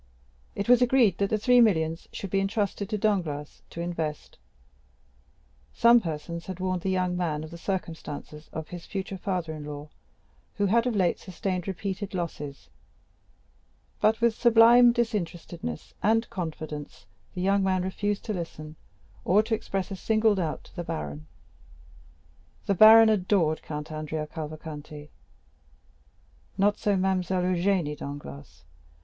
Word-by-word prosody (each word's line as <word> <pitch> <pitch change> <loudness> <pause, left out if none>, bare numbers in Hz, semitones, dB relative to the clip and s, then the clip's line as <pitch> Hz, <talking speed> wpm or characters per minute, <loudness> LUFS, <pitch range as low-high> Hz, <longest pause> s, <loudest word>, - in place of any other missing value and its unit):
It 200 - -3
was 245 0 +6
agreed 245 -7 +4
that 200 0 +1
the 215 - +1
three 245 +3 +5
millions 165 -7 +1
should 195 - -6
be 195 - +2
intrusted 200 0 -1
to 215 - -1
Danglars 170 -9 -1
to 170 - -6
invest; 160 -3 -4 1.3
some 235 0 +6
persons 170 -1 -5
had 185 -1 -6
warned 185 -1 -1
the 190 - -2
young 185 -1 0
man 160 -4 -1
of 155 - -9
the 170 - -8
circumstances 160 -5 -5
of 160 -1 -6
his 175 -1 -9
future 195 -1 -5
father 180 -4 -2
in 155 -1 -7
law, 145 0 -7 0.7
who 205 - +1
had 230 +5 +3
of 240 - -1
late 185 -4 +1
sustained 185 0 -4
repeated 195 +1 -4
losses; 150 -5 -5 1.3
but 220 +1 +3
with 235 -1 +4
sublime 235 +1 +6
disinterestedness 175 - -3
and 225 +2 +2
confidence 155 - -6 0.3
the 180 - -3
young 195 +2 +2
man 185 -1 +1
refused 205 +2 -2
to 215 - -2
listen, 155 -3 -7 0.5
or 205 +4 +4
to 220 - -3
express 195 -3 -2
a - - -3
single 215 +3 +2
doubt 170 -6 -2
to - - -19
the 175 - -4
baron. 75 - -5 1.4
The 200 - +2
baron 220 +3 +9
adored 185 -6 +2
Count 150 0 -6
Andrea 155 0 -4
Cavalcanti; 150 -1 -8 1.5
not 205 +1 +2
so 205 -2 +1
Mademoiselle 185 -1 0
Eugénie 180 -3 +1
Danglars. 70 - -9
185 Hz, 145 wpm, -27 LUFS, 155-205 Hz, 1.5 s, baron